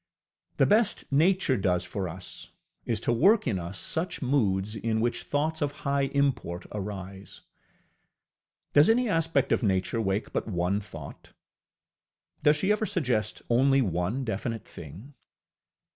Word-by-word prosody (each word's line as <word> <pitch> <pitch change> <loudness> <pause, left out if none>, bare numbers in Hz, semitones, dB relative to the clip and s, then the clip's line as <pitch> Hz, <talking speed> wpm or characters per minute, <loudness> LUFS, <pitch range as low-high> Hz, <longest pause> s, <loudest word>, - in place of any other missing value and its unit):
The - - +5
best 210 -4 +2
Nature 160 -1 +3
does 90 -2 +1
for 90 0 -4
us 90 +2 -9 0.4
is 115 -3 0
to 120 - +1
work 200 - +4
in 95 - 0
us 85 +3 -6
such 160 - -3
moods 105 -7 0
in 110 +1 -1
which 120 +1 0
thoughts 155 +2 -1
of 145 -1 0
high 140 0 +2
import 130 -11 0
arise. 100 -1 -7 1.3
Does 145 +5 +6
any 245 +2 +3
aspect 165 - +1
of - - +2
Nature 100 +1 0
wake 100 0 -2
but - - -2
one 90 0 0
thought? 80 -8 -11 1.1
Does 150 0 +5
she 190 +7 +1
ever 215 +1 +1
suggest 125 -10 -1
only 135 +3 +4
one 90 +7 -1
definite 115 0 -3
thing? 85 - -11
115 Hz, 140 wpm, -27 LUFS, 95-145 Hz, 1.3 s, Does